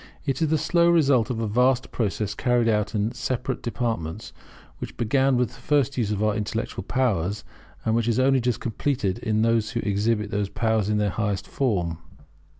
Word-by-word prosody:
It 135 Hz, -1 st, -1 dB
is 160 Hz, -, +3 dB
the 160 Hz, +1 st, +2 dB
slow 170 Hz, +3 st, +3 dB
result 140 Hz, -9 st, +3 dB
of 120 Hz, -3 st, -2 dB
a 115 Hz, -, -1 dB
vast 125 Hz, +4 st, +2 dB
process 105 Hz, -2 st, -1 dB
carried 120 Hz, +1 st, +1 dB
out 105 Hz, -1 st, +1 dB
in 105 Hz, +2 st, 0 dB
separate 130 Hz, 0 st, -3 dB
departments, 115 Hz, -9 st, -3 dB, 0.5 s
which -, -, -7 dB
began 130 Hz, +3 st, +2 dB
with 125 Hz, -1 st, +1 dB
the 125 Hz, -, -16 dB
first 140 Hz, -1 st, +1 dB
use 115 Hz, -5 st, 0 dB
of 105 Hz, 0 st, -1 dB
our 105 Hz, -1 st, +2 dB
intellectual 110 Hz, +2 st, -3 dB
powers, 105 Hz, -6 st, 0 dB, 0.4 s
and 110 Hz, -, +2 dB
which 115 Hz, 0 st, +1 dB
is 115 Hz, -1 st, +1 dB
only 135 Hz, +1 st, +4 dB
just 120 Hz, -1 st, 0 dB
completed 115 Hz, -3 st, -1 dB
in 110 Hz, -2 st, 0 dB
those 115 Hz, -2 st, +2 dB
who 120 Hz, 0 st, -3 dB
exhibit 105 Hz, +1 st, 0 dB
those 100 Hz, -1 st, -1 dB
powers 110 Hz, 0 st, 0 dB
in 105 Hz, -, +1 dB
their 105 Hz, -1 st, +1 dB
highest 100 Hz, -2 st, -2 dB
form. 90 Hz, -, -1 dB
115 Hz, 190 wpm, -24 LUFS, 105-125 Hz, 0.5 s, only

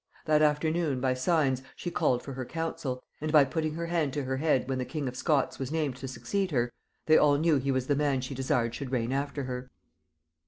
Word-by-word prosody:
That 155 Hz, -1 st, +4 dB
afternoon 155 Hz, -1 st, +2 dB
by 130 Hz, 0 st, +1 dB
signs 130 Hz, -1 st, +1 dB
she 175 Hz, -, -5 dB
called 130 Hz, -9 st, +1 dB
for 140 Hz, -, -6 dB
her 130 Hz, 0 st, -4 dB
council, 135 Hz, -4 st, -4 dB, 0.2 s
and 155 Hz, 0 st, -1 dB
by 150 Hz, -2 st, +7 dB
putting 155 Hz, +3 st, -2 dB
her 170 Hz, +1 st, -3 dB
hand 165 Hz, -5 st, 0 dB
to 145 Hz, -, -2 dB
her 130 Hz, 0 st, -2 dB
head 135 Hz, -3 st, +2 dB
when 130 Hz, -1 st, -1 dB
the -, -, 0 dB
king 145 Hz, +1 st, -4 dB
of 125 Hz, -, -4 dB
Scots 145 Hz, 0 st, +1 dB
was 135 Hz, 0 st, -3 dB
named 155 Hz, -5 st, -1 dB
to 135 Hz, -, -6 dB
succeed 195 Hz, +9 st, -2 dB
her, 120 Hz, -6 st, 0 dB, 0.3 s
they 155 Hz, -, +6 dB
all 145 Hz, -1 st, +5 dB
knew 160 Hz, 0 st, +3 dB
he 135 Hz, +1 st, -2 dB
was 130 Hz, -1 st, +1 dB
the 145 Hz, -, +1 dB
man 140 Hz, -2 st, +1 dB
she 130 Hz, +2 st, -5 dB
desired 130 Hz, -3 st, 0 dB
should 135 Hz, 0 st, -5 dB
reign 120 Hz, -2 st, 0 dB
after 140 Hz, +1 st, -2 dB
her. 125 Hz, 0 st, -5 dB
140 Hz, 230 wpm, -29 LUFS, 130-155 Hz, 0.3 s, by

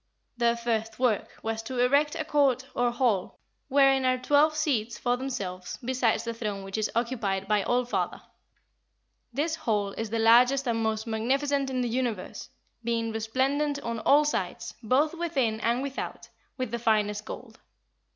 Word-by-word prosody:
Their 235 Hz, -1 st, +2 dB
first 225 Hz, -2 st, -2 dB
work 245 Hz, -5 st, +1 dB, 0.2 s
was 225 Hz, 0 st, -2 dB
to 250 Hz, +3 st, -6 dB
erect 280 Hz, +5 st, +3 dB
a 315 Hz, -, -3 dB
court 275 Hz, -4 st, +2 dB
or 245 Hz, 0 st, +2 dB
hall 240 Hz, -6 st, 0 dB, 0.3 s
wherein 270 Hz, -1 st, +4 dB
are 255 Hz, 0 st, +2 dB
twelve 290 Hz, +4 st, +3 dB
seats 240 Hz, -7 st, 0 dB
for 245 Hz, 0 st, +1 dB
themselves, 205 Hz, -9 st, -5 dB
besides 250 Hz, -3 st, +1 dB
the 230 Hz, 0 st, -3 dB
throne 210 Hz, -4 st, -4 dB
which 195 Hz, 0 st, -6 dB
is 215 Hz, -, 0 dB
occupied 225 Hz, -5 st, -1 dB
by 210 Hz, 0 st, +2 dB
All 245 Hz, +5 st, +1 dB
father. 245 Hz, -, -2 dB, 1.1 s
This 300 Hz, +6 st, -1 dB
hall 210 Hz, -9 st, 0 dB
is 225 Hz, +2 st, -4 dB
the 230 Hz, -, -1 dB
largest 245 Hz, +4 st, +5 dB
and 230 Hz, -1 st, 0 dB
most 220 Hz, -1 st, -1 dB
magnificent 270 Hz, +5 st, 0 dB
in 255 Hz, -1 st, -1 dB
the 245 Hz, -, 0 dB
universe, 235 Hz, -5 st, -3 dB, 0.3 s
being 230 Hz, -1 st, -1 dB
resplendent 270 Hz, +6 st, 0 dB
on 230 Hz, -1 st, -3 dB
all 290 Hz, +6 st, +4 dB
sides, 295 Hz, -, -2 dB
both 265 Hz, +7 st, +2 dB
within 275 Hz, -10 st, -1 dB
and 235 Hz, +4 st, 0 dB
without, 275 Hz, -1 st, -5 dB, 0.3 s
with 255 Hz, -4 st, -3 dB
the 235 Hz, -, -2 dB
finest 215 Hz, -2 st, +1 dB
gold. -, -, -9 dB
240 Hz, 160 wpm, -27 LUFS, 220-270 Hz, 1.1 s, largest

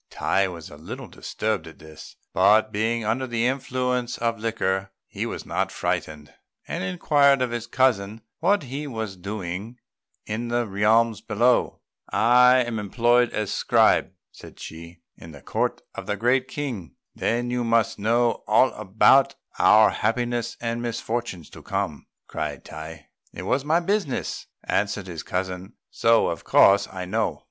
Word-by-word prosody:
Tai 95 Hz, 0 st, +1 dB
was 85 Hz, -3 st, -9 dB
a 75 Hz, -, -11 dB
little 75 Hz, -, -8 dB
disturbed 110 Hz, -6 st, -3 dB
at 80 Hz, -, -12 dB
this; 80 Hz, -1 st, -13 dB, 0.2 s
but, 110 Hz, +1 st, +4 dB
being 110 Hz, +2 st, -1 dB
under 125 Hz, +5 st, -1 dB
the 120 Hz, -1 st, -1 dB
influence 125 Hz, -1 st, -1 dB
of 115 Hz, -1 st, -1 dB
liquor, 95 Hz, -4 st, -1 dB, 0.2 s
he -, -, -4 dB
was -, -, -6 dB
not -, -, -1 dB
frightened, 75 Hz, -1 st, -3 dB, 0.3 s
and -, -, -3 dB
inquired 140 Hz, -, +3 dB
of 130 Hz, -2 st, -1 dB
his 120 Hz, -1 st, -4 dB
cousin 110 Hz, -5 st, +1 dB, 0.2 s
what 205 Hz, -4 st, +2 dB
he 140 Hz, +3 st, -5 dB
was 110 Hz, -6 st, -5 dB
doing 100 Hz, +3 st, -6 dB, 0.5 s
in 110 Hz, +3 st, -3 dB
the 120 Hz, 0 st, 0 dB
realms 110 Hz, +2 st, +2 dB
below. 120 Hz, +3 st, +1 dB, 0.3 s
"I 125 Hz, +2 st, +5 dB
am 120 Hz, -2 st, -3 dB
employed 120 Hz, +4 st, +2 dB
as 105 Hz, -2 st, -3 dB
scribe," -, -, +3 dB, 0.2 s
said -, -, -14 dB
Chi, 85 Hz, +1 st, -10 dB, 0.2 s
"in 80 Hz, -1 st, -12 dB
the 70 Hz, -, -12 dB
court -, -, -2 dB
of -, -, -8 dB
the 105 Hz, -, -1 dB
Great 125 Hz, +4 st, +2 dB
King." 120 Hz, -, -5 dB, 0.2 s
"Then 120 Hz, +1 st, -1 dB
you 125 Hz, 0 st, -1 dB
must 115 Hz, -1 st, +1 dB
know 115 Hz, +3 st, +1 dB
all 115 Hz, +5 st, +5 dB
about 110 Hz, +7 st, +4 dB, 0.2 s
our 110 Hz, 0 st, +6 dB
happiness 120 Hz, 0 st, -1 dB
and 115 Hz, 0 st, -3 dB
misfortunes 115 Hz, -6 st, -4 dB
to -, -, -12 dB
come," -, -, -3 dB, 0.2 s
cried -, -, -5 dB
Tai. 80 Hz, 0 st, -9 dB, 0.3 s
"It 90 Hz, -, -6 dB
is 130 Hz, +8 st, 0 dB
my 155 Hz, +3 st, +2 dB
business," 190 Hz, -5 st, -2 dB, 0.2 s
answered 100 Hz, -1 st, -1 dB
his 85 Hz, -4 st, -6 dB
cousin, 95 Hz, +2 st, -4 dB, 0.2 s
"so 115 Hz, 0 st, +3 dB
of 85 Hz, -, -5 dB
course 100 Hz, +1 st, +5 dB
I 95 Hz, -1 st, -5 dB
know. 110 Hz, +4 st, -1 dB
115 Hz, 155 wpm, -24 LUFS, 95-120 Hz, 0.5 s, our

